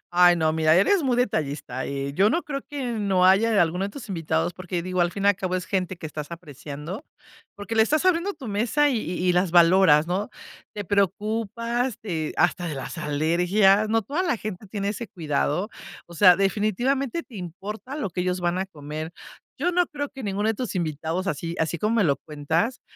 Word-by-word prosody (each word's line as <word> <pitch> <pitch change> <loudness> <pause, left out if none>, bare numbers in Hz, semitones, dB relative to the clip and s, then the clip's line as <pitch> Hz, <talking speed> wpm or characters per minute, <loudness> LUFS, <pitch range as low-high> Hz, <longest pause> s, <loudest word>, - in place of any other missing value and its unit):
Ay, 175 0 +6
no, 160 -1 +1
mira, 155 0 +3
eres 335 - +4
muy 255 -3 +1
detallista. 145 - -1
Eh, 140 0 -3
yo 200 +6 +4
no 345 - +1
creo 275 -2 -5
que 285 -3 -4
no 195 -4 +2
haya 205 +3 +4
alguno 180 +4 -1
de 200 - -3
tus 240 -1 -10
invitados, 165 -1 -1
porque 180 -1 -4
digo, 185 0 -2
al 175 0 +2
fin 200 0 -4
y - - +6
al 205 - +4
cabo 185 -1 -2
es 180 - -4
gente 185 -1 -1
que 160 - -7
estás 150 0 -7
apreciando, 155 - -8 0.5
porque 205 +2 -6
le 220 - +7
estás 305 +9 +1
abriendo 365 +2 +2
tu 265 - -10
mesa, 240 +8 +2
y 255 -5 +1
y 180 -2 0
las 180 0 +2
valoras, 170 -2 +6
¿no?, 195 +6 -2 0.4
te 205 -1 -4
preocupas 220 +5 -1
de 165 -7 -3
hasta 175 - +2
de 155 - -3
las 135 - -6
alergias, 180 +8 +3
no 225 +1 +2
toda 295 - -2
la 335 -9 0
gente 210 -1 -6
tiene 200 0 -3
ese 215 +2 -4
cuidado. 165 +2 -1 0.4
O 170 - -13
sea, 180 0 +7
definitivamente 235 - 0
te 240 -6 -13
importa 195 - -7
lo 205 -11 -3
que 180 - -3
ellos 180 0 -1
van 175 +1 0
a 190 - -1
comer. 155 0 -7 0.5
Yo 355 +6 0
no 355 -1 +3
creo 290 -2 -4
que 270 -2 -10
ninguno 205 +1 -1
de 225 - +1
tus 245 -2 -4
invitados, 165 +2 -2
así 165 +1 -3
así 160 +1 -1
como 220 +2 0
me 205 - +3
lo 140 -3 +2
cuentas, 160 - -2
190 Hz, 205 wpm, -25 LUFS, 170-225 Hz, 0.5 s, le